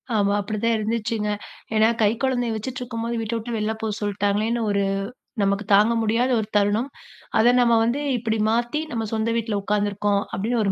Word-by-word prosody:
ஆமா. 200 -1 +2
அப்படிதான் 220 +3 0
இருந்துச்சுங்க. 220 0 -1 0.5
ஏன்னா, 215 0 +5
கை 210 - +5
கொழந்தய 245 -3 0
வச்சுட்ருக்கும்போது 235 0 -4
வீட்ட 225 +1 -3
விட்டு 230 +1 -4
வெளில 215 +1 -1
போ 220 - -1
சொல்ட்டாங்களேன்னு 205 +3 0
ஒரு 200 0 +1 0.6
நமக்கு 200 +1 +1
தாங்க 210 +3 +4
முடியாத 230 +4 +1
ஒரு 215 - -3
தருணம். 205 +6 +1 0.5
அத 240 +2 +5
நம்ம 235 -1 +4
வந்து, 240 +5 0 0.2
இப்டி 225 -1 -1
மாத்தி 240 +6 0
"நம்ம 225 -2 -2
சொந்த 220 +1 0
வீட்ல 220 -3 -1
உட்காந்துருக்கோம்". 205 0 0
அப்டின்னு 230 +4 0
ஒரு 200 - +1
220 Hz, 160 wpm, -23 LUFS, 205-235 Hz, 0.6 s, ஏன்னா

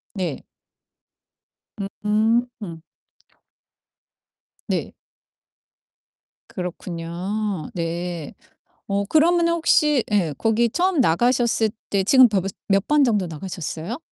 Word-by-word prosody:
네. 175 -8 -3 1.6
음. 220 +3 +2 2.2
네. - - -2 1.5
그렇군요. 180 +2 -4
네. 170 -2 -4 0.6
어 200 0 +1
그러면은 335 - +3
혹시 300 -5 +3
예 180 -7 +1
거기 230 +1 +2
처음 350 - +1
나가셨을 235 +3 +2 0.2
때 195 -1 +1
지금 255 +4 +6
벌써 195 -2 -1 0.2
몇 195 +1 +2
번 300 -1 +4
정도 210 -8 +1
나가셨어요? 165 +4 -5
205 Hz, 160 characters per minute, -22 LUFS, 175-245 Hz, 2.2 s, 지금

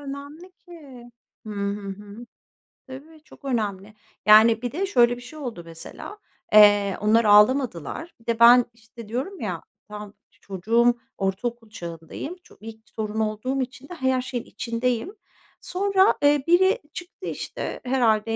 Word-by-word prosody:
önemli 285 +6 -9
ki. 285 -10 -14 0.4
Hı - - -6
hı, 200 0 -4
hı. 205 +4 -9 0.6
Tabii, 305 +4 -12
çok 280 - -18
önemli. 210 -5 -3 0.3
Yani, 220 +2 +7
bir 245 - -3
de 375 +7 -2
şöyle 245 -10 +3
bir - - -11
şey 280 +6 -11
oldu 240 -11 -6
mesela, 165 - -10 0.4
eee, 205 -2 +6
onlar 220 +2 +3
ağlamadılar 210 - +3
Bir 230 - -24
de 230 -1 -1
ben, 240 +1 +8
işte, 230 0 -14
diyorum 265 - -4
ya, - - -4 0.3
tamam, 210 -1 -9 0.2
çocuğum, 230 +6 +1 0.2
ortaokul 225 +4 -3
çağındayım, 170 - -8
ço - - -20
ilk 220 0 -11
torun 220 0 -3
olduğum 220 +5 -1
için 270 +2 -7
de - - -7
ha 340 - -12
her 260 -1 +2
şeyin 250 -2 -5
içindeyim. 240 - -3 0.5
Sonra, 390 +1 +2
eee, 290 -1 +4
biri 375 +6 +4
çıktı, 365 +1 -9
işte, - - -5
herhâlde 225 -4 +1
235 Hz, 145 wpm, -24 LUFS, 210-280 Hz, 0.6 s, ben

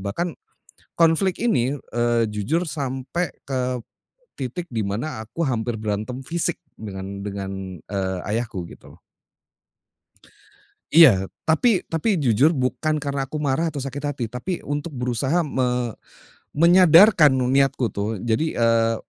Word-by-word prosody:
Bahkan, 160 - -3 0.6
konflik 170 +3 +2
ini, 135 - +1 0.2
eee, 120 0 +2
jujur 130 - -1
sampai 140 +4 -3 0.2
ke 130 -1 -1 0.7
titik 140 +7 -5
di 110 -4 -2
mana 110 +3 -4
aku 140 +10 -6
hampir 115 -2 -2
berantem 110 +5 -3
fisik 170 +5 -2 0.2
dengan 100 -1 -7
dengan, 95 -3 -6
eee, 95 -2 -2
ayahku, 105 -5 -3
gitu. - - -15 1.9
Iya. 130 - +7 0.2
Tapi 180 +5 +2
tapi 175 +5 0
jujur 135 +5 +4
bukan 155 +3 0
karena 140 -1 -2
aku 155 - -4
marah 150 +4 0
atau 140 - -4
sakit 140 +2 -5
hati, 140 -4 -2
tapi 125 +10 -4
untuk 145 +2 -4
berusaha 130 +6 0
me 125 -4 -1 0.6
menyadarkan 170 0 +7
nu 130 -1 0
niatku 135 -3 +2
tuh. 105 +2 -2
Jadi, 120 +8 0
eee, 115 -1 +3
130 Hz, 125 wpm, -23 LUFS, 110-160 Hz, 1.9 s, Iya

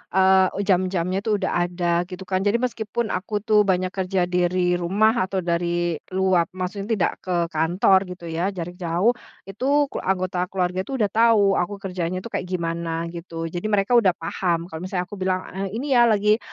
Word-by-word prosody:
eee, 190 +1 +4
jam-jamnya 185 -1 +1
tuh 210 0 0
udah 195 -2 -1 0.2
ada 175 0 0
gitu 185 0 -8
kan. 185 0 -1
Jadi 205 +3 +1
meskipun 235 -2 -2
aku 205 +2 -3
tuh 210 -2 +3
banyak 185 -1 +1
kerja 190 -1 -1
dari 180 0 +1
rumah 210 +4 +2
atau 190 -1 -2
dari 170 -1 -1 0.2
luar, 185 -3 +2
maksudnya 195 +2 -4
tidak 185 - +1
ke 185 - -4 0.2
kantor 180 +3 +2
gitu 170 -2 -8
ya, 170 +3 -1
jarak 175 +1 -6
jauh, 180 +6 +2 0.3
itu 270 +8 0
ku - - -4
anggota 185 -1 -1
keluarga 185 0 -2
itu 270 - -3
udah 210 -6 0
tahu 220 -3 +4
aku 180 +3 -2
kerjanya 185 -2 -4
itu 235 - -8
kayak 180 - -3
gimana 170 -1 -3
gitu. 165 -1 -6
Jadi 175 +5 -3
mereka 205 +1 +1
udah 190 -6 +2
paham 175 -3 -2
kalau 160 - -6
misalnya 180 +1 -2
aku 195 +2 -10
bilang, 185 0 -2
eee, 195 +1 -3
"Ini 265 0 +1
ya 240 - +6
lagi 210 0 +3
185 Hz, 185 wpm, -23 LUFS, 175-200 Hz, 0.3 s, ya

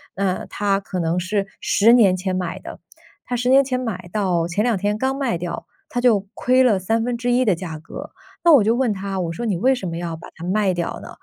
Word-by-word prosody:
那 190 -1 -1
他 200 -1 0
可 190 -2 -5
能 170 +1 0
是 195 +2 -1
10 225 +4 +4
年 200 -7 +5
前 185 0 -2
买 180 0 -3
的。 - - -10 0.4
他 245 - -3
10 245 +1 0
年 270 +1 +6
前 255 -1 -2
买， 190 -8 -5
到 180 -5 0
前 190 +5 -1
两 240 -1 +2
天 205 +2 0
刚 265 +3 0
卖 265 -9 -1
掉， 175 0 -5 0.2
他 245 - -2
就 220 -6 +3
亏 255 +1 +3
了 220 -7 +3
1/3 240 +5 0
的 205 - +4
价 165 -2 -6
格。 260 - -9 0.3
那 340 - +6
我 280 -8 +7
就 225 +3 +3
问 250 -2 +1
他， 195 -1 -4
我 170 -2 -2
说： 235 +8 -5
“你 205 - 0
为 260 +9 +2
什 195 -8 -5
么 165 0 -4
要 170 -1 -4
把 160 - -11
它 165 - -11
卖 190 +1 +1
掉 170 -1 -3
呢？” - - -9
200 Hz, 235 characters per minute, -21 LUFS, 180-245 Hz, 0.4 s, 我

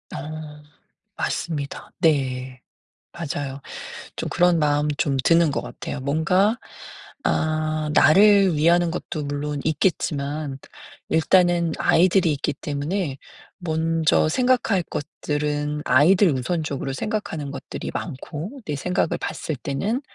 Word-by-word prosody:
어. 150 0 -7 0.5
맞습니다. 145 -4 -3
네. 130 -5 0 0.5
맞아요. 140 -4 -4 0.6
좀 - - -4
그런 175 -1 +3
마음이 150 0 +1
좀 140 -2 +1
드는 165 0 +4
것 140 - -1
같아요. - - -6
뭔가 180 - +2 0.7
아 155 -1 0
나를 195 +3 +6
위하는 170 +3 +3
것도 155 -2 -4
물론 145 +1 -3
있겠지만 150 -3 -1 0.5
일단은 170 0 +3
아이들이 180 0 +4
있기 145 +1 -2
때문에 145 +2 -3 0.4
먼저 160 -2 +1
생각할 245 -4 +2
것들은 150 0 -3
아이들 180 +7 +5
우선적으로 140 0 -2
생각하는 160 -5 -3
것들이 140 -1 -6
많고 170 - -6
내 150 - -2
생각을 180 +4 0
봤을 155 - -4
때는 170 - -2
155 Hz, 245 characters per minute, -23 LUFS, 145-175 Hz, 0.7 s, 나를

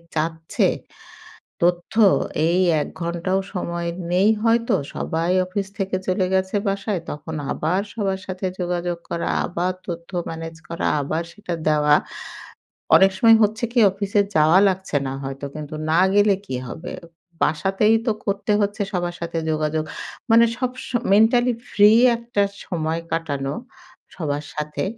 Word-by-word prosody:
চাচ্ছে 160 +1 0 1.0
তথ্য 175 +3 +1 0.5
এই 175 +2 +2 0.2
১ - - -3
ঘন্টাও 170 +3 -1
সময় 170 -2 -3 0.2
নেই 190 +4 +4
হয়তো 230 0 +3 0.2
সবাই 165 +2 -1
অফিস 195 +2 -3
থেকে 190 -1 -1
চলে 185 0 +1
গেছে 190 +1 0
বাসায় 195 -1 -1
তখন 150 +2 -6 0.2
আবার 175 +5 0
সবার 195 -3 -1
সাথে 185 0 -4
যোগাযোগ 175 -1 -2
করা, 170 - -2 0.2
আবার 180 +1 -1
তথ্য 170 -1 -6 0.2
ম্যানেজ 165 0 -6
করা, 170 - -3 0.2
আবার 155 +4 -2
সেটা 180 -3 -5
দেওয়া। 150 -1 +4 1.0
অনেক 195 0 +6
সময় 225 +2 +7
হচ্ছে 220 +3 0
কি 245 - +3
অফিসে 200 +1 0
যাওয়া 155 +3 +5
লাগছে 190 -5 -2
না 135 - -3
হয়তো। 135 +1 -5
কিন্তু 155 0 -6 0.2
না 165 - +4 0.2
গেলে 205 -1 +5
কি 130 - -4
হবে? 160 +7 -7 0.5
বাসাতেই 195 +8 +2
তো - - +4
করতে 200 +1 -1
হচ্ছে 205 +1 -1
সবার 175 -1 -2
সাথে 170 0 -3
যোগাযোগ। 155 0 0 0.5
মানে 230 +1 +7
সব 250 0 -1 0.2
সময় 240 -2 -2
মেন্টালি 240 +4 +4 0.2
ফ্রি 210 0 +6 0.3
একটা 235 -3 -2 0.2
সময় 160 -2 -2
কাটানো 145 -4 -2 0.6
সবার 145 -4 -3
সাথে। 150 0 -3
180 Hz, 140 wpm, -22 LUFS, 160-200 Hz, 1.0 s, সময়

